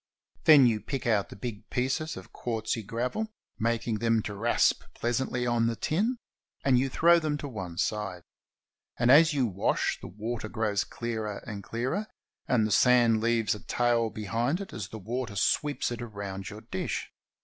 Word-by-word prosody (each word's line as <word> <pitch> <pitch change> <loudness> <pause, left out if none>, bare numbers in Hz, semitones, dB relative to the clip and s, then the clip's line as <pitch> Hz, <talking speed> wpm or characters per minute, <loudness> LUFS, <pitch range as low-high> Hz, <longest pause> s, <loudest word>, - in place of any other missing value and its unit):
Then 145 -4 +9
you 110 -3 +2
pick 135 +5 -4
out 110 -4 +2
the - - -9
big 105 0 -7
pieces 135 +6 -1
of - - -11
quartzy 115 -1 -2
gravel, 125 - -2 0.3
mak 115 +1 0
ing 110 -2 0
them 115 -1 +2
to 105 - -4
rasp 115 +4 +2
pleasantly 125 +1 -1
on 120 -1 +2
the 115 - 0
tin, 215 - 0 0.5
and 130 -3 +5
you 135 +1 0
throw 170 +5 +5
them 155 -2 -1
to 145 - -5
one 95 -9 -6
side. 95 -5 -2 0.7
And 120 +1 +4
as 155 +2 +7
you 135 -3 +3
wash, 100 -3 0
the - - -7
water 110 +3 -5
grows 105 -3 0
clearer 110 -3 -4
and 105 -4 -6
clearer, 130 - -2 0.4
and 115 -4 +3
the 110 - -2
sand 120 -2 +5
leaves 115 -1 +2
a 105 - -7
tail 120 -1 +1
behind 115 - -1
it 200 - -7
as 105 -4 -5
the 110 - -8
water 115 +1 -4
sweeps 145 +7 +1
it 120 - -4
round 100 -4 -6
your 105 0 -9
dish. 110 -4 -4
115 Hz, 180 wpm, -28 LUFS, 105-125 Hz, 0.7 s, Then